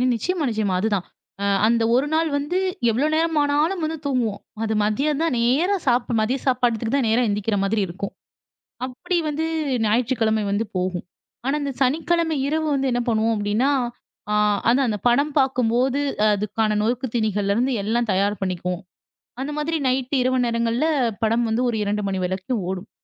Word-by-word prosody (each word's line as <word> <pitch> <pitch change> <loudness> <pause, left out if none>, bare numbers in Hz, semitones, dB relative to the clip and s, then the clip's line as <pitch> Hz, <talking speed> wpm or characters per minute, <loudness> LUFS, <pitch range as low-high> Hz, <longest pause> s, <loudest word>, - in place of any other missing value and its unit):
நிச்சயமா, 345 - -1
நிச்சயமா. 210 -4 0
அதுதான். 205 -4 0 0.4
அ - - +1 0.2
அந்த 230 0 +2
ஒரு 275 +3 +2
நாள் 325 0 +2
வந்து 295 +6 -2 0.3
எவ்வளோ 255 +7 +1
நேரமானாலும் 320 +2 +1
வந்து 320 +1 -2
தூங்குவோம். 245 -7 -1 0.2
அது 220 0 0
மதியம் 280 +8 0
தான் 325 -7 +1
நேரா 285 +12 +2
சாப் 245 -1 +2
மதிய 250 +5 0
சாப்பாட்டுக்கு 240 -1 +1
தான் 260 -5 +1
நேரா 235 +3 +3
எந்திரிக்கிற 205 0 0
மாதிரி 205 +1 +1
இருக்கும். 190 +3 -6 0.7
அப்படி 260 +8 -3
வந்து 315 +2 -2 0.4
ஞாயிற்றுக்கிழமை 220 -1 +1
வந்து 215 +3 0
போகும். 180 -1 -2 0.4
ஆனா, 275 +2 +1
இந்த 280 -1 -2
சனிக்கிழமை 320 +4 +1
இரவு 315 +2 0
வந்து 270 -1 +1
என்ன 245 0 +1
பண்ணுவோம்? 225 0 +2
அப்டின்னா, 210 +6 +1 0.6
ஆ - - +1 0.3
அதான் 255 +2 +3
அந்த 210 -2 -2
படம் 280 +5 +2
பார்க்கும்போது, 255 +1 +1 0.3
அதுக்கான 210 +1 0
நொறுக்கு 245 +4 0
தீனிகள்லருந்து 215 +3 +1
எல்லாம் 230 +1 0
தயார் 200 +1 +1
பண்ணிக்குவோம். 180 -1 -3 0.6
அந்த 290 +2 -3
மாதிரி 320 +2 -1
நைட்டு 260 +1 0
இரவு 255 0 +1
நேரங்கள்ல, 235 +5 0 0.4
படம் 230 +2 +2
வந்து 225 +3 0
ஒரு 225 - -1
2 205 +1 -1
மணி 190 - -2
வரைக்கும் 190 +4 -2
ஓடும். 190 +1 -5
240 Hz, 155 wpm, -22 LUFS, 210-280 Hz, 0.7 s, நேரா